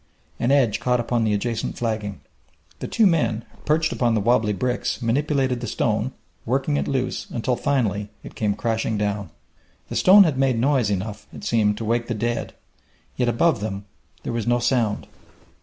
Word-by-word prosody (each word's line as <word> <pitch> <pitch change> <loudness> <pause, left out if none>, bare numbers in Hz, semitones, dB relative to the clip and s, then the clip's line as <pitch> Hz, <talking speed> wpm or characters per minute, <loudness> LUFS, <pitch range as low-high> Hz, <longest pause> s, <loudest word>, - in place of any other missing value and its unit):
An 120 - +1
edge 125 -7 +3
caught 125 -1 +1
upon 120 0 0
the 105 - +1
adjacent 115 +2 -2
flagging. 110 -4 -3 0.6
The - - -4
two 225 - +3
men, 120 - +1 0.2
perched 155 +1 +2
upon 120 -2 +1
the - - +2
wobbly 110 0 +2
bricks, 125 +5 -1
manipulated 130 +1 0
the 120 - -4
stone, - - 0 0.3
working 135 +4 0
it - - -1
loose, 130 -2 -2
until, 125 +1 -1
finally, 105 -8 0
it - - -10
came 105 -2 -1
crashing 110 0 -1
down. 100 -2 -2 0.6
The - - -5
stone 195 +2 +8
had 150 -7 0
made 135 -3 +2
noise 130 -2 +2
enough, 105 +1 -4
it - - -10
seemed, 105 -3 +2
to 115 - -4
wake 115 +1 0
the 120 - -2
dead; 120 +2 -2 0.6
yet 125 -1 +1
above 120 +3 +2
them 100 -1 -4 0.4
there - - -3
was 115 -1 -2
no 120 0 +3
sound. 120 -3 0
120 Hz, 175 wpm, -23 LUFS, 105-130 Hz, 0.6 s, stone